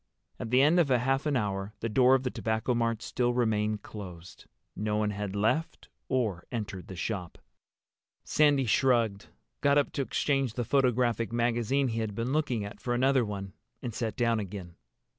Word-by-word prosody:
At - - -4
the 130 +3 +5
end 160 +5 +5
of 160 -5 +3
half 135 +3 +2
an 145 -3 +2
hour 100 -1 -2
the 115 - -2
door 125 +4 +5
of 135 - 0
the 125 - -1
Tobacco 110 +2 -1
Mart 115 -1 0
still 120 0 0
remained 110 -3 0
closed. 90 -4 -10 0.3
No 105 0 -1
one 105 -1 +1
had 105 -1 -4
left 110 +11 -1 0.2
or 110 -10 -1
entered 105 -6 -5
the 95 - -8
shop. 90 -1 -4 0.9
Sandy 145 -3 +3
shrugged, 115 -4 +2 0.3
got 140 0 +4
up 145 - +2
to 140 - -2
exchange 135 -3 0
the 120 - -2
photographic 125 -3 +2
magazine 120 +3 +1
he 115 0 -2
had 110 -2 -3
been 115 +4 -2
looking 130 -9 0
at 100 - -9
for 120 -1 -1
another 130 +1 +3
one, 100 -3 -5 0.3
and 120 - -4
sat 110 -1 -3
down 115 -3 +1
again. 95 -3 -6
115 Hz, 180 wpm, -29 LUFS, 105-130 Hz, 0.9 s, the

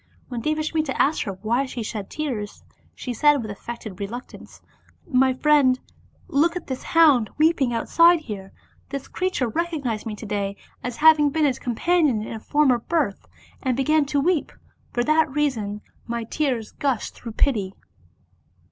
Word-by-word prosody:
When 240 -2 -4
Devasmita 310 0 -1
asked 300 +3 +3
her 200 - -3
why 240 +5 +1
she 245 -3 -5
shed 210 -2 -5
tears, 245 -10 -4 0.3
she 250 - -5
said 295 +4 +4
with 215 -4 -5
affected 215 -1 -8
reluctance: 230 +5 -8 0.5
"My 265 -4 +3
friend, 260 -1 +3 0.5
look 335 +1 +2
at 360 - -5
this 260 -1 -5
hound 290 -10 +4
weeping 305 -5 +3
outside 335 +8 +4
here. 200 -8 -7 0.4
This 275 0 -5
creature 365 -9 -1
recognized 275 -6 -2
me 215 - -4
to 215 - -9
day 200 -1 -2 0.3
as 245 -1 -4
having 310 -2 +6
been 310 +2 +1
its 265 -4 0
companion 265 -1 +1
in - - -6
a 220 - -5
former 270 0 +2
birth, 285 -6 -1 0.3
and 255 -3 0
began 305 +2 +3
to 285 0 0
weep; 325 +1 +1 0.4
for 240 - 0
that 310 +2 +3
reason 230 -8 -1 0.3
my 235 0 -2
tears 245 -3 -2
gushed 270 -6 -2
through 230 -2 -9
pity." 210 -8 0
265 Hz, 155 wpm, -23 LUFS, 225-305 Hz, 0.5 s, having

